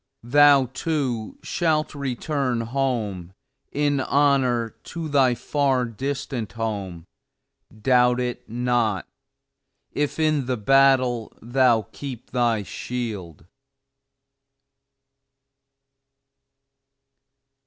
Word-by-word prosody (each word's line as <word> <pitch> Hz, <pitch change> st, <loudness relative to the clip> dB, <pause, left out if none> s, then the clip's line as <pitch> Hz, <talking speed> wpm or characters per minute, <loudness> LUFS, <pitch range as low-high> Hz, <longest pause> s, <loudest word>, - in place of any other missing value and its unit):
Thou, 140 Hz, +2 st, +6 dB
too, 130 Hz, -9 st, -2 dB
shalt 155 Hz, -3 st, 0 dB
return 135 Hz, -2 st, -2 dB
home, 115 Hz, -8 st, -2 dB, 0.4 s
in 145 Hz, -1 st, +1 dB
honor 130 Hz, -5 st, +2 dB
to 165 Hz, -2 st, -5 dB
thy 135 Hz, -4 st, +3 dB
far 135 Hz, -1 st, 0 dB
distant 125 Hz, -2 st, -4 dB
home, 100 Hz, -7 st, -4 dB, 0.8 s
doubt 125 Hz, -1 st, +4 dB
it 125 Hz, -2 st, -4 dB
not 120 Hz, -4 st, 0 dB, 0.8 s
if 145 Hz, -1 st, -2 dB
in 155 Hz, -4 st, +1 dB
the 130 Hz, -1 st, -1 dB
battle 130 Hz, -1 st, +3 dB
thou 120 Hz, -2 st, +2 dB
keep 130 Hz, -4 st, -8 dB
thy 120 Hz, -4 st, +1 dB
shield. 100 Hz, -10 st, -6 dB
125 Hz, 80 wpm, -23 LUFS, 115-140 Hz, 0.8 s, Thou